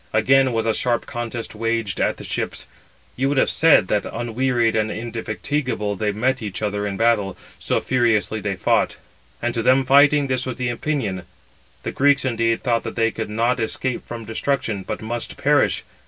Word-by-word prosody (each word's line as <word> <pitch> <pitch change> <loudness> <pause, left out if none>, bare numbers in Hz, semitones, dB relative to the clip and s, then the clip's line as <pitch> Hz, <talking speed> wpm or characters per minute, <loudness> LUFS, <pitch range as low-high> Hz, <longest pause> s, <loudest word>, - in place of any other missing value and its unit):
Again 130 +4 +4
was 115 -1 -1
a 110 - +2
sharp 120 0 0
contest 120 -1 -5
waged 115 -3 -2
at - - +1
the - - -9
ships. - - -4 0.5
You 135 +2 0
would 145 - 0
have - - +3
said 160 -12 +5
that 105 - +1
unwearied 120 0 0
and 110 0 +1
indefatigable 115 0 -3
they 105 +2 -1
met 130 +5 0
each 105 -1 -5
other 105 0 -1
in 100 -1 -4
battle, 110 -4 +1 0.2
so - - 0
furiously 115 -4 +1
they 100 -2 -2
fought. 90 - +1 0.5
And 120 0 0
to 115 - -1
them 130 +3 +4
fighting 145 +2 +5
this 130 -1 -1
was 130 - -3
the 125 -1 -1
opinion: 120 -7 -2 0.6
the - - -3
Greeks, 140 0 +3
indeed, 115 -2 0
thought 120 -3 +1
that - - -6
they 115 -1 +2
could 110 -2 -5
not 115 +4 +1
escape 125 +2 -2
from 115 -1 -7
destruction, 115 -2 -2
but 105 +3 -5
must 120 +1 -4
perish. - - +2
115 Hz, 185 wpm, -22 LUFS, 110-130 Hz, 0.6 s, said